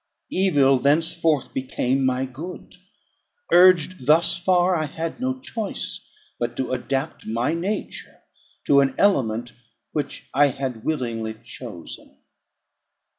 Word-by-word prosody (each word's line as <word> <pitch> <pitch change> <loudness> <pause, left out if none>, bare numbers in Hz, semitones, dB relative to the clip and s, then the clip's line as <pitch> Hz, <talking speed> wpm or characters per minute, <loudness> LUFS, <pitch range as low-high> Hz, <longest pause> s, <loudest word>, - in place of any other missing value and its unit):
Evil 145 -8 +3
thenceforth 155 +1 +1
became 130 0 -1
my 130 0 +1
good. 155 +8 -9 0.8
Urged 180 -5 +5
thus 160 +3 +5
far, 180 +1 +2
I 155 -2 -1
had 165 +6 -5
no 260 +1 -2
choice 225 -5 -4 0.4
but 120 0 -3
to 130 - -2
adapt 135 +4 -3
my 115 +6 0
nature 190 +5 -5 0.4
to 140 - +5
an 135 -1 +2
element 120 - +1 0.4
which 150 -2 -4
I 145 +1 +5
had 130 -4 -4
willingly 115 -7 -2
chosen. 110 -8 -10
140 Hz, 115 wpm, -23 LUFS, 125-175 Hz, 0.8 s, Urged